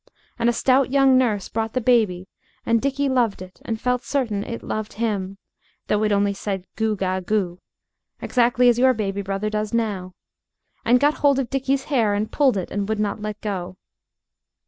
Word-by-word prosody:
And 235 Hz, 0 st, +3 dB
a -, -, +4 dB
stout 260 Hz, +3 st, +2 dB
young 270 Hz, -1 st, +4 dB
nurse 220 Hz, -7 st, +1 dB
brought 225 Hz, 0 st, -3 dB
the 255 Hz, -, +1 dB
baby, 220 Hz, -7 st, +2 dB, 0.4 s
and 230 Hz, -1 st, +2 dB
Dickie 275 Hz, +1 st, 0 dB
loved 245 Hz, -6 st, +1 dB
it 185 Hz, 0 st, -12 dB
and 225 Hz, -1 st, -3 dB
felt 250 Hz, +1 st, 0 dB
certain 230 Hz, -8 st, -1 dB
it 230 Hz, -, -6 dB
loved 215 Hz, -1 st, -4 dB
him, 200 Hz, -4 st, -2 dB, 0.5 s
though 210 Hz, -, +2 dB
it 210 Hz, -, +1 dB
only 200 Hz, 0 st, +2 dB
said, 195 Hz, -2 st, -4 dB
"Goo 220 Hz, -1 st, 0 dB
ga 190 Hz, -1 st, -1 dB
goo," 185 Hz, -2 st, -1 dB, 0.6 s
exactly 245 Hz, 0 st, +2 dB
as 240 Hz, -1 st, +4 dB
your 260 Hz, 0 st, +4 dB
baby 200 Hz, -2 st, -2 dB
brother 195 Hz, +2 st, -3 dB
does 215 Hz, +1 st, -2 dB
now, 195 Hz, -6 st, -2 dB, 0.7 s
and 245 Hz, +2 st, +4 dB
got 290 Hz, +3 st, +2 dB
hold 280 Hz, -2 st, +4 dB
of 265 Hz, -3 st, -2 dB
Dickie's 270 Hz, 0 st, 0 dB
hair 230 Hz, -9 st, +1 dB
and 210 Hz, +1 st, -2 dB
pulled 270 Hz, -7 st, +3 dB
it 185 Hz, -, -4 dB
and 205 Hz, 0 st, -2 dB
would 220 Hz, -1 st, -1 dB
not 210 Hz, 0 st, -2 dB
let 210 Hz, 0 st, -5 dB
go. 185 Hz, -3 st, -4 dB
220 Hz, 190 wpm, -22 LUFS, 200-250 Hz, 0.7 s, a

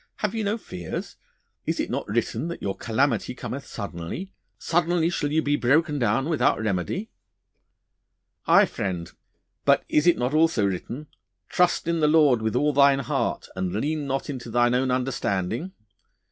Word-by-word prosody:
Have 210 Hz, -2 st, -2 dB
you 225 Hz, -1 st, -2 dB
no 205 Hz, +2 st, 0 dB
fears? 90 Hz, -, -6 dB, 0.5 s
Is -, -, -1 dB
it -, -, -2 dB
not -, -, -2 dB
written 120 Hz, +8 st, -1 dB
that 170 Hz, -, -5 dB
your 95 Hz, -, -2 dB
calamity 125 Hz, +1 st, 0 dB
cometh 135 Hz, +2 st, -6 dB
suddenly 100 Hz, -, -6 dB, 0.2 s
suddenly 170 Hz, 0 st, +1 dB
shall 145 Hz, -4 st, -1 dB
you 160 Hz, +1 st, +2 dB
be 145 Hz, +1 st, +2 dB
broken 145 Hz, +3 st, +2 dB
down 135 Hz, +3 st, +1 dB
without 160 Hz, -3 st, +2 dB
remedy?' 110 Hz, -, -2 dB, 1.4 s
'Aye, -, -, +7 dB
friend, 90 Hz, -4 st, -4 dB, 0.5 s
but -, -, +4 dB
is 150 Hz, +3 st, +2 dB
it 175 Hz, -, +5 dB
not 125 Hz, +3 st, -1 dB
also 155 Hz, -9 st, +3 dB
written, 110 Hz, +9 st, -4 dB, 0.4 s
"Trust 180 Hz, -1 st, +2 dB
in 170 Hz, 0 st, +1 dB
the 150 Hz, -, +3 dB
Lord 150 Hz, -6 st, +5 dB
with 110 Hz, +1 st, -1 dB
all 150 Hz, +3 st, +2 dB
thine 140 Hz, 0 st, +5 dB
heart, 135 Hz, -2 st, -2 dB
and 95 Hz, -1 st, -2 dB
lean 145 Hz, +7 st, -1 dB
not 135 Hz, 0 st, -2 dB
unto 130 Hz, -5 st, -6 dB
thine 120 Hz, +1 st, +3 dB
own 130 Hz, +1 st, +1 dB
understanding!" 125 Hz, -, -1 dB
135 Hz, 160 wpm, -25 LUFS, 115-160 Hz, 1.4 s, Aye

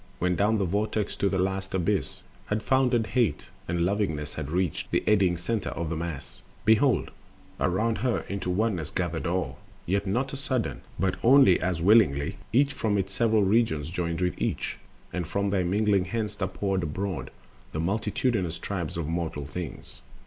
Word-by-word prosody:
When 90 Hz, 0 st, +1 dB
down 105 Hz, +4 st, +2 dB
the 100 Hz, -, +1 dB
Vortex 105 Hz, +3 st, -1 dB
to 100 Hz, -, +2 dB
the 95 Hz, -, 0 dB
last 95 Hz, +1 st, -1 dB
abyss 90 Hz, -3 st, -1 dB, 0.2 s
Had 105 Hz, +1 st, -1 dB
foundered 125 Hz, -3 st, +3 dB
Hate, 120 Hz, -1 st, 0 dB, 0.2 s
and 85 Hz, 0 st, +1 dB
Lovingness 90 Hz, -7 st, -1 dB
had 70 Hz, -, -5 dB
reached 90 Hz, 0 st, -1 dB
The -, -, +1 dB
eddying 95 Hz, -5 st, +3 dB
center 105 Hz, +5 st, -2 dB
of 85 Hz, -1 st, -4 dB
the -, -, -1 dB
Mass, 80 Hz, -5 st, -6 dB, 0.2 s
behold 120 Hz, +5 st, +3 dB, 0.5 s
Around 110 Hz, +5 st, +1 dB
her 125 Hz, -1 st, +1 dB
into 100 Hz, -2 st, -3 dB
Oneness 90 Hz, -5 st, 0 dB
gathered 85 Hz, -2 st, -2 dB
all. 90 Hz, +2 st, -2 dB, 0.3 s
Yet 100 Hz, +3 st, 0 dB
not 130 Hz, +8 st, 0 dB
a -, -, -3 dB
sudden, 130 Hz, -4 st, -2 dB, 0.2 s
but 95 Hz, -1 st, 0 dB
only 125 Hz, -7 st, +6 dB
as 90 Hz, -2 st, -1 dB
willingly 90 Hz, -9 st, +4 dB
Each 140 Hz, +4 st, +3 dB
from 105 Hz, -2 st, 0 dB
its 95 Hz, 0 st, -2 dB
several 110 Hz, 0 st, +3 dB
region 100 Hz, -7 st, +2 dB
joined 85 Hz, +1 st, -3 dB
with 90 Hz, 0 st, -1 dB
each; -, -, -2 dB, 0.3 s
And 90 Hz, -3 st, -2 dB
from 100 Hz, +2 st, 0 dB
their 95 Hz, -2 st, +2 dB
mingling 100 Hz, +1 st, +2 dB
thence 110 Hz, -3 st, -2 dB
are 95 Hz, -, +2 dB
poured 95 Hz, 0 st, -1 dB
abroad 90 Hz, +4 st, -3 dB, 0.4 s
The 80 Hz, -, -4 dB
multitudinous 100 Hz, 0 st, 0 dB
tribes 90 Hz, -6 st, -4 dB
of 85 Hz, -, -2 dB
mortal 80 Hz, -3 st, -2 dB
things. 80 Hz, +3 st, -7 dB
95 Hz, 170 wpm, -27 LUFS, 85-110 Hz, 0.5 s, only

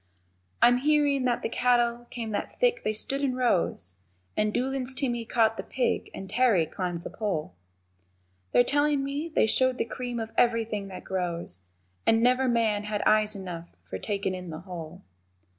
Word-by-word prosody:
I'm 245 Hz, +1 st, +7 dB
hearin' 285 Hz, -1 st, +2 dB
that 245 Hz, -1 st, 0 dB
the -, -, +1 dB
cattle 240 Hz, 0 st, +1 dB
came 230 Hz, -3 st, -5 dB
that 205 Hz, -, -3 dB
thick -, -, +3 dB
they -, -, 0 dB
stood 270 Hz, +6 st, -1 dB
in 265 Hz, -3 st, 0 dB
rows, 90 Hz, -, +1 dB, 0.4 s
And 210 Hz, 0 st, +1 dB
Doolan's 260 Hz, +2 st, -1 dB
Timmy 240 Hz, -4 st, -1 dB
caught 225 Hz, -1 st, +2 dB
the -, -, -2 dB
pig 255 Hz, -, -1 dB
and 190 Hz, -, -7 dB
Terry 215 Hz, -5 st, +3 dB
climbed 175 Hz, 0 st, -4 dB
the -, -, -6 dB
pole, 175 Hz, -, -3 dB, 1.0 s
They're 245 Hz, -, +6 dB
tellin' 290 Hz, +1 st, +2 dB
me 285 Hz, +4 st, -3 dB
they 315 Hz, -, +3 dB
showed 255 Hz, +3 st, +2 dB
the -, -, 0 dB
cream 245 Hz, 0 st, -4 dB
of 225 Hz, 0 st, -4 dB
everything 225 Hz, -4 st, +1 dB
that 185 Hz, -2 st, -8 dB
grows, 170 Hz, -, -2 dB, 0.5 s
And 225 Hz, +1 st, +4 dB
never 255 Hz, +2 st, +4 dB
man 220 Hz, -4 st, +1 dB
had 210 Hz, -1 st, -2 dB
eyes 215 Hz, 0 st, +3 dB
enough 175 Hz, -3 st, -7 dB
for 95 Hz, +2 st, -5 dB
takin' 195 Hz, -, -2 dB
in 180 Hz, -1 st, -6 dB
the 160 Hz, 0 st, -6 dB
whole. 175 Hz, -1 st, -8 dB
230 Hz, 175 wpm, -27 LUFS, 190-255 Hz, 1.0 s, I'm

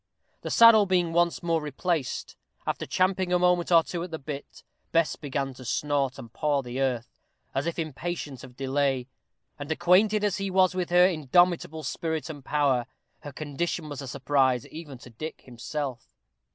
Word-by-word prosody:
The -, -, -5 dB
saddle 225 Hz, -3 st, +7 dB
being 175 Hz, -3 st, +1 dB
once 175 Hz, +1 st, +2 dB
more 165 Hz, -2 st, +1 dB
replaced, 150 Hz, 0 st, -2 dB, 0.3 s
after -, -, -2 dB
champing 185 Hz, -1 st, +1 dB
a 180 Hz, -, +4 dB
moment 180 Hz, 0 st, +2 dB
or 165 Hz, -1 st, +7 dB
two 175 Hz, 0 st, -5 dB
at 180 Hz, -, -5 dB
the 160 Hz, -, -4 dB
bit, 145 Hz, -1 st, -8 dB, 0.3 s
Bess 165 Hz, -1 st, +2 dB
began 140 Hz, -2 st, -3 dB
to 130 Hz, -, -12 dB
snort 140 Hz, +1 st, 0 dB
and 115 Hz, -1 st, -11 dB
paw 145 Hz, 0 st, 0 dB
the 125 Hz, +2 st, -4 dB
earth, 125 Hz, -3 st, -2 dB, 0.3 s
as 135 Hz, +4 st, -1 dB
if 170 Hz, -, -2 dB
impatient 155 Hz, -3 st, -4 dB
of 125 Hz, -, -12 dB
delay; 135 Hz, -1 st, 0 dB, 0.5 s
and, 145 Hz, +2 st, -5 dB
acquainted 190 Hz, +6 st, +3 dB
as 205 Hz, -3 st, +1 dB
he 195 Hz, -1 st, -2 dB
was 185 Hz, -1 st, +3 dB
with 180 Hz, -1 st, -2 dB
her 180 Hz, +1 st, +6 dB
indomitable 165 Hz, -1 st, +2 dB
spirit 160 Hz, -1 st, -3 dB
and 145 Hz, -3 st, -11 dB
power, 135 Hz, -4 st, +1 dB, 0.3 s
her 145 Hz, -, -9 dB
condition 155 Hz, +3 st, -3 dB
was 145 Hz, -2 st, -6 dB
a 135 Hz, -, -7 dB
surprise 130 Hz, -1 st, +1 dB
even 155 Hz, -4 st, -9 dB
to 125 Hz, 0 st, -14 dB
Dick 155 Hz, +8 st, -7 dB
himself. 130 Hz, +1 st, -5 dB
155 Hz, 175 wpm, -27 LUFS, 135-175 Hz, 0.5 s, saddle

